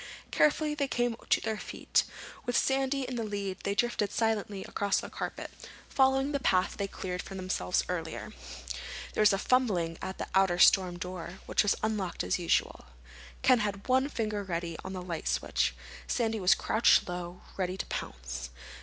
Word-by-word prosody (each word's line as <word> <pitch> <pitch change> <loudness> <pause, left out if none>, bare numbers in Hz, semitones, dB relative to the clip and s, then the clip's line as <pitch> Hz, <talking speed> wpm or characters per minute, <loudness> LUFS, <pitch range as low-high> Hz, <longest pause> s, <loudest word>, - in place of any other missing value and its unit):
Carefully 300 0 +3
they 285 -2 0
came 240 -2 0
to - - +5
their 220 -1 -2
feet. - - 0 0.4
With 245 - +2
Sandy 270 0 +1
in 255 -1 -4
the 230 - -1
lead 200 -3 -3
they 200 - -1
drifted 210 -2 +1
silently 210 -3 0
across 200 -1 0
the - - -7
carpet, - - -5 0.4
following 270 +1 +3
the 280 - 0
path 185 -7 +2
they 200 - -1
had 195 - -9
cleared 180 -1 -4
for 195 - -9
themselves 185 - 0
earlier. - - -4 0.8
There - - +1
was 210 -1 +7
a 195 - +2
fumbling 195 -9 +1
at 190 0 -5
the - - -3
outer 190 -2 +4
storm 180 -1 +5
door, 180 0 -6
which - - +3
was 205 - +3
unlocked 210 -5 -1
as - - 0
usual. 170 - 0 0.6
Ken 255 -2 +6
had 200 -2 -2
one 260 +2 +3
finger 215 -5 -2
ready 170 -3 -3
on 190 - -6
the 185 -1 -5
light 170 -3 -4
switch. - - +1 0.3
Sandy 225 -2 0
was 190 +2 +5
crouched 225 +2 +4
low, 180 0 -6
ready 185 -1 -2
to - - -3
pounce. 65 0 -5
200 Hz, 180 wpm, -30 LUFS, 180-240 Hz, 0.8 s, was